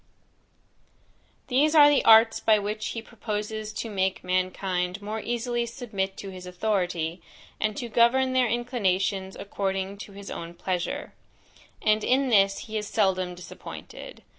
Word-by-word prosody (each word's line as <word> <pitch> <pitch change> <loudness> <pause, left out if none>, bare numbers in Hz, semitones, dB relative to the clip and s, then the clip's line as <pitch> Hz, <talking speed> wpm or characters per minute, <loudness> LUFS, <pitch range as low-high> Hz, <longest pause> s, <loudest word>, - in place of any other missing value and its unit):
These 295 +5 +2
are 295 -2 +9
the 290 -1 +4
arts 225 0 +7
by 215 -1 +4
which 210 +1 -3
he 230 - -5
proposes 215 -1 -4
to 230 - -4
make 190 -3 -1
mankind 185 0 -1
more 210 +2 -4
easily 240 +1 -1
submit 210 -5 -4
to 195 - -7
his 185 -1 -9
authority, 180 -3 -1 0.4
and 215 -1 -1
to 240 - -3
govern 245 +3 +3
their 255 -1 +3
inclinations 195 -5 0
according 195 0 -3
to 205 - -9
his 200 0 -9
own 170 +1 -7
pleasure: 185 - -3 0.7
and 215 0 +3
in 265 +1 +2
this 195 -3 +4
he 220 -1 -3
is 210 - -6
seldom 185 -4 +1
disappointed. 180 - -10
210 Hz, 140 wpm, -26 LUFS, 190-235 Hz, 0.7 s, are